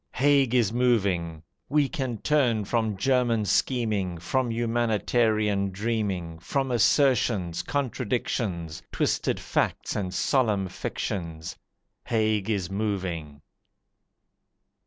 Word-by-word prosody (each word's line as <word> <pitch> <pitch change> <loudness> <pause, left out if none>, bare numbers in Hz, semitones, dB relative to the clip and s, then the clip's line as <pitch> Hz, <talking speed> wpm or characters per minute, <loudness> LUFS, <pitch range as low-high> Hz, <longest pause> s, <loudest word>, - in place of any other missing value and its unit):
Haig 140 -2 +3
is 115 -4 +3
moving! 95 -10 +1 0.3
We 145 0 +3
can 130 -7 -3
turn 120 -5 +1
from 110 -2 0
German 120 -1 +2
scheming, 105 -7 0
From 125 +9 -1
humanitarian 110 -3 +1
dreaming, 95 -5 -2
From 135 - -1
assertions, 115 - +2
contradictions, 110 - -2
Twisted - - 0
facts - - -1
and 95 -3 -2
solemn 105 -2 +1
fictions 85 -3 -4 0.5
Haig 110 -2 +1
is 100 -5 0
moving! 90 -8 -3
110 Hz, 95 wpm, -26 LUFS, 95-125 Hz, 0.5 s, Haig